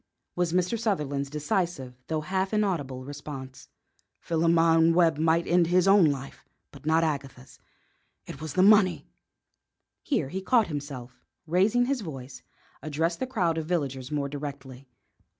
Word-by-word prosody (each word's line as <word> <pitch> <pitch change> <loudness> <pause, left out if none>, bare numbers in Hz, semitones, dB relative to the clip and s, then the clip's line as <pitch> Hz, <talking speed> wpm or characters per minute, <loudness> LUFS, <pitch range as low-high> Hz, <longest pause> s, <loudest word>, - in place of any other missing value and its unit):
was 175 -2 0
Mr. 180 +6 0
Sutherland's 145 -11 -1
decisive 150 - -2
though 155 -1 -1
half 190 +5 -1
inaudible 145 -12 -1
response. 140 -2 -9 0.5
"Philemon 165 0 +3
Webb 165 -3 +3
might 165 +1 +2
end 175 -1 +3
his 180 +2 +3
own 195 -2 +6
life, 140 -2 -3 0.3
but 140 +1 -12
not 160 +1 +3
Agatha's. 135 -4 -4 0.7
It 135 - -9
was 155 -3 -5
the 185 - +3
money 200 -3 +5 0.5
" - - -58
Here 160 - -1
he 190 +6 -4
caught 230 +3 +3
himself 140 -5 -6
up, 125 - -32 0.3
and, 165 - -12
raising 210 +7 +3
his 270 -1 -1
voice, 135 -7 -8 0.4
addressed 160 +3 -2
the 260 - -2
crowd 175 -10 0
of 155 - -5
villagers 135 -6 -2
more 145 -2 -1
directly. 140 -2 -8
160 Hz, 150 wpm, -27 LUFS, 140-180 Hz, 0.7 s, own